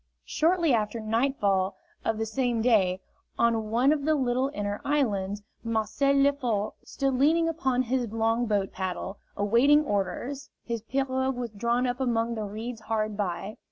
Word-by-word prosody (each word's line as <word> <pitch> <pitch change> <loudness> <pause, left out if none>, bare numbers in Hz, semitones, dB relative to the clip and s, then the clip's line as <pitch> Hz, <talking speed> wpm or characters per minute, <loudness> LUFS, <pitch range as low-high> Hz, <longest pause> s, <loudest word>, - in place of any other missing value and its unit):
Shortly 335 -2 +2
after 220 0 0
nightfall 215 -4 +1 0.3
of 225 - 0
the 225 - -1
same 235 0 0
day, 190 -6 +3 0.4
on 225 -2 +2
one 245 +5 +3
of 290 -2 -2
the 310 +1 +3
little 260 -1 +1
inner 205 -2 -3
islands, 205 -8 0 0.2
Marcel 230 +5 +1
Lefort 270 -7 +1
stood 275 -1 -1
leaning 315 +6 +3
upon 265 -6 0
his 250 0 -1
long 225 +1 +1
boat 200 -3 0
paddle, 190 +1 -4 0.2
awaiting 245 +9 +4
orders; 250 +7 -2
his 230 -2 -3
pirogue 260 +2 -1
was 240 -2 -4
drawn 235 +4 0
up 245 0 -1
among 235 -2 0
the 215 -2 -3
reeds 220 +3 -6
hard 215 -1 -1
by. 195 +1 -3
235 Hz, 155 wpm, -27 LUFS, 215-265 Hz, 0.4 s, awaiting